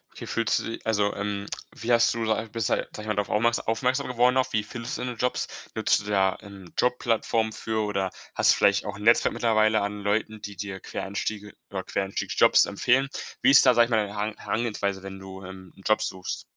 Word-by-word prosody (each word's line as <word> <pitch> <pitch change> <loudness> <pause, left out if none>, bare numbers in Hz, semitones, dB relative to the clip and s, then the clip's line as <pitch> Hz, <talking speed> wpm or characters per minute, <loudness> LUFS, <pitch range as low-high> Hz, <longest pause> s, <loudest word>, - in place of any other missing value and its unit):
Wie - - -8
fühlst 115 -2 +1
du - - -5
di 115 - -5
also, 105 -2 +1
ähm, 100 0 -3 0.3
wie 115 +2 -3
hast 115 -1 +4
du 115 0 -3
da 110 0 +2
bist 115 +1 -3
du - - +3
ja, - - -1
sage - - -8
ich 105 - -9
mal, 105 - 0
drauf 100 0 -1
aufmerk 115 +2 +2
aufmerksam 125 +4 0
geworden 125 +1 +3
auf? 130 - +1
Wie 110 -1 +1
findest 115 +2 -6
du - - -6
deine 125 -1 -4
Jobs? 125 +3 -1 0.3
Nutzt - - +2
du - - -12
da 95 -1 +3
'n 100 -3 -12
Jobplattform 115 -2 +1
für 110 0 -2
oder 100 -3 -1 0.2
hast - - +5
du - - +3
vielleicht 100 0 +3
auch 100 -2 -5
'n 105 - -9
Netzwerk 115 +2 +4
mittlerweile 110 -1 +3
an 105 0 -3
Leuten, 110 +1 -1
die 105 -1 -7
dir 100 -1 -6
Quereinstiege 105 +1 -4 0.2
oder - - -3
Quereinstiegjobs 95 0 +2
empfehlen? 130 +6 +1 0.3
Wie - - +5
ist 135 - +7
da, 130 - +7
sage 120 0 +5
ich - - -9
mal, 115 - +4
deine 100 - -8
Heran 105 +1 -2
Herangehensweise, 100 -4 -2
wenn 95 0 -7
du, 95 0 -10
ähm, 95 0 -11
'n - - -17
Job 110 - +3
suchst? 95 -1 -4
105 Hz, 230 wpm, -26 LUFS, 100-115 Hz, 0.3 s, ist